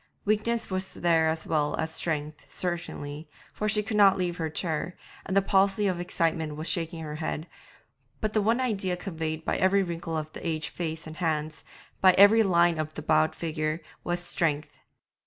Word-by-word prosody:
Weakness 215 +1 0
was 185 0 -2
there 165 -2 +3
as 160 0 -2
well 150 -2 +1
as 160 0 -2
strength, 150 -2 -2
certainly, 165 -4 -3 0.2
for 215 - -1
she 210 0 +3
could 210 0 -2
not 195 -2 +6
leave 175 -2 -1
her 160 -2 -2
chair, 160 +1 -3 0.3
and 190 - 0
the 195 - +5
palsy 195 +1 +3
of 185 -3 0
excitement 165 -3 -1
was 155 +2 -5
shaking 165 -1 -1
her 150 -1 -5
head, 155 0 -3 0.7
but 215 -2 -2
the 215 - +3
one 225 +4 +2
idea 195 -8 0
conveyed 160 -4 -4
by - - 0
every 195 +1 +3
wrinkle 165 -2 -4
of 155 0 -5
the - - -8
aged 160 -2 -2
face 165 -2 -4
and 155 0 -9
hands, 155 -2 -2 0.4
by 185 -1 +7
every 205 +4 +7
line 175 -4 +3
of 155 0 -3
the 155 - -6
bowed 155 0 +3
figure, 155 -1 -2 0.2
was 175 0 -1
strength. 155 -4 -1
170 Hz, 185 wpm, -27 LUFS, 155-190 Hz, 0.7 s, by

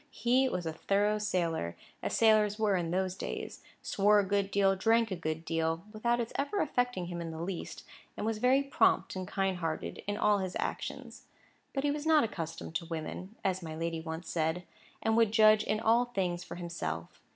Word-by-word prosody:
He 255 +1 +2
was 180 -5 -3
a 160 - -2
thorough 205 +5 +1
sailor, 170 - -1 0.2
as - - -1
sailors 215 -2 +4
were 215 -3 +2
in 175 -2 -1
those 185 +1 0
days—swore 205 +2 -1
a 200 - +1
good 200 0 0
deal, 195 -1 +3
drank 225 +3 +2
a - - 0
good 160 -1 -4
deal 165 0 -1
(without 235 +2 +1
its 235 -1 -3
ever 285 +9 -1
affecting 245 - 0
him 175 0 -5
in 165 - -4
the 160 0 -6
least), 185 -1 -5 0.3
and - - -3
was 220 -1 -1
very 260 +4 +4
prompt 275 - +2
and 185 -1 -4
kind 195 -1 0
hearted 165 -2 -3
in 205 0 -1
all 210 -1 +3
his 185 -1 -3
actions; - - -5 0.5
but 270 - -2
he 290 - +2
was 295 +1 -3
not 315 -2 +6
accustomed 165 -7 -5
to 170 - -9
women, 170 +5 -5
as 190 -1 +1
my 160 -2 -6
lady 165 0 -2
once 160 +1 -6
said, 160 +2 -1 0.4
and 220 0 +2
would 225 -2 +4
judge 215 -1 +6
in 215 - 0
all 230 +3 +3
things 185 -7 -2
for - - -8
himself. 125 - -5
195 Hz, 195 wpm, -31 LUFS, 170-220 Hz, 0.5 s, not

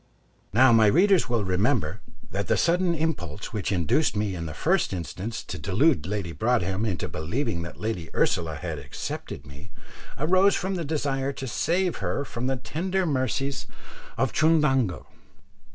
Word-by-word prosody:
Now 125 +4 +6
my 110 -2 +6
readers 180 - +4
will 115 -3 +1
remember 95 - 0 0.3
that 100 +1 -2
the - - +2
sudden 175 0 +2
impulse 155 - -3
which 105 -2 -2
induced 95 - +2
me 105 -1 0
in 85 -2 -4
the 75 - -6
first - - +1
instance 95 +6 -5
to - - -6
delude 100 - +2
Lady 100 -4 -3
Broadhem 110 -1 0
into 90 -6 -2
believing 85 - -2
that 85 - -8
Lady 105 -7 -3
Ursula 80 -3 +1
had 75 - -5
accepted - - -6
me, 70 +8 -12 0.5
arose 185 +7 +4
from 190 +1 -2
the 175 -3 -2
desire 140 -3 -1
to 135 - -6
save 175 - 0
her 95 +9 -2
from 120 0 -4
the 135 0 0
tender 185 - -1
mercies 135 -1 -1 0.5
of - - +1
Chundango. 150 - +2
115 Hz, 155 wpm, -26 LUFS, 95-155 Hz, 0.5 s, Now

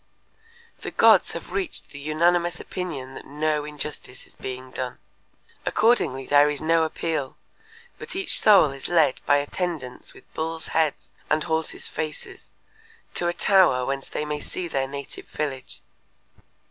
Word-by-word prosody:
The - - -5
gods - - +5
have - - -7
reached 385 -4 -3
the 140 - -9
unanimous 170 +4 +2
opinion 145 -8 -5
that - - -10
no 150 +1 0
injustice 150 -3 -6
is - - -18
being 130 0 -7
done. 125 -1 -4 0.7
Accordingly 210 - +2
there 145 +1 +5
is 145 -1 -2
no 165 +1 +3
appeal, 160 -4 -3 0.6
but - - -7
each 385 0 +4
soul 200 -9 +6
is 135 -1 -5
led 160 -6 +3
by 145 - +6
attendants 145 -3 -4
with - - -18
bulls' 160 0 -4
heads 160 -2 0 0.2
and 155 0 +2
horses' 160 -1 -1
faces 380 - -6 0.6
to 175 - 0
a 175 - +1
tower 175 -9 +4
whence 135 0 -3
they 150 - -3
may 150 0 -3
see 180 +4 -4
their 135 -4 -1
native 140 0 -7
village. 135 -4 -4
150 Hz, 145 wpm, -25 LUFS, 135-170 Hz, 0.7 s, soul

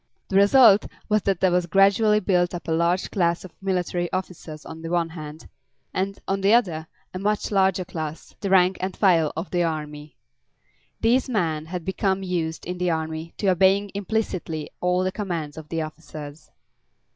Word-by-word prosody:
The 190 - -2
result 205 +1 +6 0.2
was 215 0 +3
that 195 -2 0
there 185 - +4
was 180 0 +1
gradually 200 +4 +4
built 180 -3 +1
up 175 - -8
a - - -1
large 170 +3 +1
class 170 -2 0
of 180 - -12
military 180 -2 -1
officers 170 -5 -6
on 160 0 -9
the 165 - -6
one 170 -1 0
hand, 155 -1 -9 0.5
and, 195 +1 -2
on 195 0 -1
the 200 +4 +5
other, 165 -9 0 0.3
a 185 - -4
much 210 +2 -1
larger 190 -2 +2
class, 160 -2 -6
the 200 - -3
rank 185 -1 +4
and 185 0 -3
file 170 -6 +3
of 165 +3 -4
the 175 - +1
army. 150 -3 -4 0.8
These 250 +4 +2
men 160 -9 -1
had 175 0 -5
become 190 0 0
used, 170 -3 -3
in 180 +1 -5
the 180 0 +1
army, 160 0 -3
to 200 - +1
obeying 190 +2 +3
implicitly 195 -6 -3
all 180 +1 +1
the 185 - 0
commands 170 -8 -4
of 155 -1 -10
the 165 -1 -1
officers. 155 -1 -9
180 Hz, 180 wpm, -24 LUFS, 160-195 Hz, 0.8 s, result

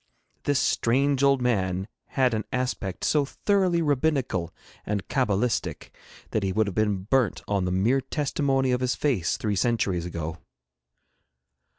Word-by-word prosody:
This 145 -2 +2
strange 135 +3 +2
old 140 -2 +3
man 95 -5 0 0.3
had 130 -3 +3
an 110 -1 -1
aspect 125 -7 -3
so 150 -2 +3
thoroughly 180 +3 +1
rabbinical 135 - 0 0.3
and 100 -2 -3
cabalistic 120 -2 -1 0.4
that 110 - 0
he 95 -1 0
would 110 +3 +2
have 100 - -4
been 105 -2 0
burnt 125 +1 +1
on 100 -3 0
the 90 - -1
mere 110 +9 +2
testimony 135 -1 0
of 125 0 0
his 125 0 +1
face 125 - 0
three 105 -2 -1
centuries 95 -5 0
ago. 80 -1 -5
120 Hz, 145 wpm, -26 LUFS, 95-135 Hz, 0.4 s, old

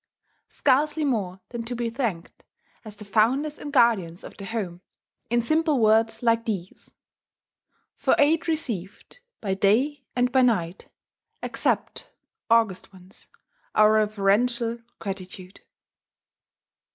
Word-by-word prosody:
Scarcely 295 +3 +1
more 195 -8 -2
than 235 -1 -5
to 245 +1 -4
be 235 -1 -2
thanked, 225 -9 -4 0.4
as 215 -2 -10
the 210 - -11
founders 260 +9 +1
and 290 - -7
guardians 195 -9 +2
of - - -10
the 200 - -9
home, 195 -5 -4 0.5
in 240 0 +1
simple 310 +1 +1
words 225 +1 +3
like 230 -1 +2
these: 195 -5 -5 1.1
"For - - +2
aid 315 +3 +3
received, 235 - -4 0.2
by 195 -3 -1
day 250 +9 +1
and 250 0 +1
by 260 0 +4
night, 195 -8 0 0.5
accept, - - -2 0.4
August 225 -6 +2
Ones, 185 -1 -14 0.5
our 215 0 +6
reverential 220 +3 +1 0.2
gratitude."... 190 -1 -7
225 Hz, 115 wpm, -25 LUFS, 195-250 Hz, 1.1 s, our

